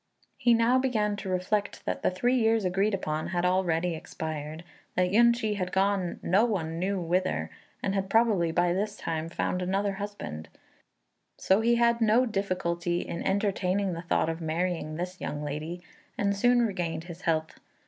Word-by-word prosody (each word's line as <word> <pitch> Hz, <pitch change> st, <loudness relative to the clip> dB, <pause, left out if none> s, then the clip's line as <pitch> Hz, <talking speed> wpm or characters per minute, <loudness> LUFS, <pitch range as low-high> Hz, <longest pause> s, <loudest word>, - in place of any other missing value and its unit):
He 240 Hz, -1 st, +4 dB
now 235 Hz, +3 st, +4 dB
began 215 Hz, -6 st, +1 dB
to 200 Hz, -1 st, -5 dB
reflect 185 Hz, +3 st, -1 dB
that -, -, -2 dB
the -, -, +2 dB
three 240 Hz, +8 st, +1 dB
years 225 Hz, -3 st, +2 dB
agreed 195 Hz, +3 st, +1 dB
upon 155 Hz, -4 st, -3 dB
had 175 Hz, 0 st, -1 dB
already 180 Hz, -2 st, +1 dB
expired; 155 Hz, 0 st, -6 dB, 0.3 s
that 180 Hz, 0 st, +2 dB
Yün 235 Hz, +3 st, +6 dB
ch'i 215 Hz, -3 st, -2 dB
had 180 Hz, -2 st, -2 dB
gone 190 Hz, -2 st, +1 dB
no 195 Hz, +5 st, +4 dB
one 170 Hz, -8 st, -1 dB
knew 195 Hz, +2 st, 0 dB
whither, 175 Hz, -, -1 dB, 0.3 s
and 195 Hz, -, 0 dB
had 195 Hz, -1 st, -1 dB
probably 210 Hz, -7 st, +3 dB
by 175 Hz, +1 st, +2 dB
this 205 Hz, +3 st, -2 dB
time 165 Hz, 0 st, -3 dB
found 180 Hz, +2 st, -1 dB
another 195 Hz, +2 st, 0 dB
husband; 140 Hz, -, -6 dB, 0.9 s
so 190 Hz, +3 st, +3 dB
he 235 Hz, +1 st, +3 dB
had 235 Hz, 0 st, +3 dB
no 225 Hz, +3 st, +4 dB
difficulty 175 Hz, -5 st, -1 dB
in 170 Hz, -, -5 dB
entertaining 195 Hz, -1 st, 0 dB
the 165 Hz, -, -5 dB
thought 170 Hz, -, +1 dB
of 165 Hz, +1 st, -3 dB
marrying 165 Hz, -1 st, -2 dB
this 180 Hz, +2 st, -5 dB
young 150 Hz, 0 st, -4 dB
lady, 155 Hz, +4 st, -5 dB, 0.3 s
and 200 Hz, 0 st, +1 dB
soon 245 Hz, +4 st, +4 dB
regained 170 Hz, -6 st, -2 dB
his 170 Hz, +1 st, -10 dB
health. 160 Hz, -2 st, -1 dB
185 Hz, 170 wpm, -28 LUFS, 170-205 Hz, 0.9 s, Yün